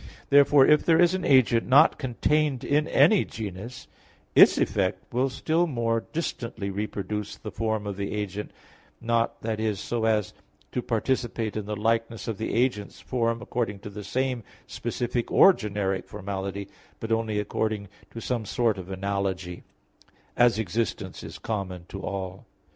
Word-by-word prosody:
Therefore 140 -1 +7
if 150 0 +5
there 165 -1 +4
is 175 0 +5
an 185 -1 -2
agent 125 -4 +4
not 145 +5 +6
contained 140 +1 0
in 150 +4 +1
any 215 -4 +5
genus, 110 +3 -7 0.5
its - - +7
effect 95 +1 -1
will 130 +3 +2
still 165 +6 0
more 115 -5 -1
distantly 115 -10 -3
reproduce 105 +1 -4
the 105 - -8
form 110 0 -2
of 100 -1 -4
the 100 0 -3
agent, 105 -1 -4 0.5
not, 115 0 0
that 110 -1 -2
is, 110 -3 -1
so 115 -2 -2
as 110 -3 +1 0.4
to 125 - -1
participate 115 -2 -1
in 105 -2 -4
the 105 - -2
likeness 115 0 -1
of 110 -4 -3
the 110 - -2
agent's 115 -4 0
form 115 -1 -1
according 115 -5 -2
to 105 +1 -9
the 105 +1 -7
same 130 +2 -1 0.2
specific 120 0 -3
or 195 - +7
generic 100 - -2
formality, 100 -1 -5 0.3
but 115 - -5
only 110 -1 0
according 105 0 -2 0.2
to 115 - -8
some 120 -1 -2
sort 110 -1 0
of 90 0 -8
analogy; 95 -2 -3 0.7
as 120 -2 +4
existence 110 +1 -2
is - - -8
common 95 -5 -4
to 95 - -7
all. 95 -1 -5
110 Hz, 155 wpm, -26 LUFS, 100-125 Hz, 0.7 s, Therefore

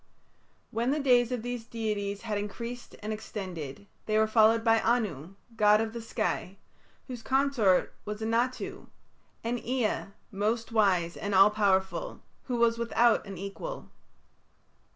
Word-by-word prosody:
When 230 +3 0
the 295 +3 +1
days 250 -3 +4
of 245 -3 -2
these 245 -1 -4
deities 210 -3 -3
had 220 -2 -2
increased 235 +4 -6
and 215 +1 -2
extended, 185 -7 -6 0.2
they 215 0 +2
were 220 - +5
followed 220 +1 +4
by 225 -1 +4
Anu, 195 - -1 0.2
god 210 -1 +5
of 220 0 -2
the 235 - -5
sky, 215 -4 -2 0.5
whose 250 -3 -7
consort 260 -7 +2
was 210 0 -5
Anatu; 230 +3 -1 0.6
and 235 +1 -2
Ea, 245 -3 0 0.3
most 220 +4 -1
wise 185 -6 +2
and 200 -1 -2
all 195 +2 +7
powerful, 200 - 0 0.3
who 250 - -2
was 230 0 +3
without 235 -1 +2
an 195 -2 -7
equal. 200 - -7
220 Hz, 140 wpm, -29 LUFS, 205-235 Hz, 0.6 s, all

